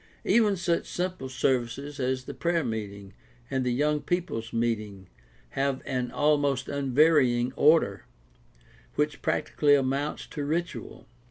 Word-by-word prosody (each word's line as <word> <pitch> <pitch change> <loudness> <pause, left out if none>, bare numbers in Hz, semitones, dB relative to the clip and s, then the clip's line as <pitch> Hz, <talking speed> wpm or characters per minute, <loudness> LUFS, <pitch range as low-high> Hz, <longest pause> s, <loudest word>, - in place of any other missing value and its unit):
Even 215 -4 +4
such 170 -1 0
simple 180 -7 -3
services 130 +2 -1
as 130 0 -1
the - - -7
prayer 170 -1 0
meeting 100 -3 -5 0.4
and 130 -1 0
the 125 - 0
young 150 +4 +1
people's 175 -11 -2
meeting 110 -5 -2 0.4
have 135 - -1
an 125 -1 -2
almost 145 -2 +1
unvarying 135 -3 +3
order, 160 +3 +3 0.9
which 150 0 -1
practically 150 -1 +2
amounts 140 +2 -1
to 145 - -6
ritual. 165 +4 -4
140 Hz, 120 wpm, -27 LUFS, 125-150 Hz, 0.9 s, Even